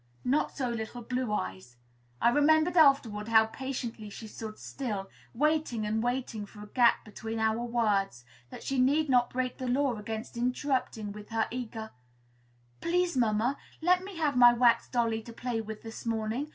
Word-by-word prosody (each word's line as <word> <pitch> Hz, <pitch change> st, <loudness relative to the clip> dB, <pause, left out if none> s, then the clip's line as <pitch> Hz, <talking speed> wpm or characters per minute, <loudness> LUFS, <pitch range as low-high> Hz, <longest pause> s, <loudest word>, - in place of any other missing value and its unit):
Not 275 Hz, +4 st, +1 dB
so 265 Hz, -3 st, 0 dB
little 235 Hz, +1 st, -5 dB
Blue 250 Hz, -1 st, -2 dB
Eyes. 95 Hz, -, -4 dB, 0.4 s
I -, -, +5 dB
remembered 315 Hz, +6 st, +4 dB
afterward 275 Hz, -9 st, +4 dB
how 220 Hz, -1 st, +6 dB
patiently 235 Hz, -3 st, -5 dB
she 220 Hz, -, -9 dB
stood 215 Hz, 0 st, -8 dB
still, 210 Hz, -8 st, -5 dB, 0.2 s
waiting 300 Hz, -5 st, +1 dB
and 220 Hz, +1 st, 0 dB
waiting 240 Hz, -3 st, -2 dB
for 210 Hz, 0 st, -12 dB
a 210 Hz, -, -12 dB
gap 240 Hz, +1 st, +3 dB
between 225 Hz, +1 st, -6 dB
our 220 Hz, +1 st, +1 dB
words, 210 Hz, -, 0 dB, 0.2 s
that -, -, -10 dB
she 270 Hz, -1 st, -1 dB
need 285 Hz, +4 st, +3 dB
not 245 Hz, -2 st, +4 dB
break 255 Hz, 0 st, -3 dB
the 255 Hz, -, -3 dB
law 260 Hz, 0 st, +1 dB
against 220 Hz, +3 st, -6 dB
interrupting, 250 Hz, -3 st, -1 dB
with 210 Hz, 0 st, -10 dB
her 225 Hz, -1 st, 0 dB
eager 225 Hz, -3 st, -5 dB, 0.9 s
"Please, 350 Hz, -1 st, +1 dB
mamma, 235 Hz, +2 st, +1 dB, 0.2 s
let 360 Hz, +2 st, +3 dB
me 385 Hz, -2 st, -8 dB
have 300 Hz, -4 st, +1 dB
my 245 Hz, -1 st, +8 dB
wax 235 Hz, -1 st, +3 dB
dolly 230 Hz, -2 st, 0 dB
to 230 Hz, +1 st, -11 dB
play 235 Hz, -1 st, -3 dB
with 220 Hz, -1 st, -8 dB
this 225 Hz, 0 st, -8 dB
morning! 230 Hz, +5 st, -2 dB
235 Hz, 170 wpm, -30 LUFS, 220-265 Hz, 0.9 s, my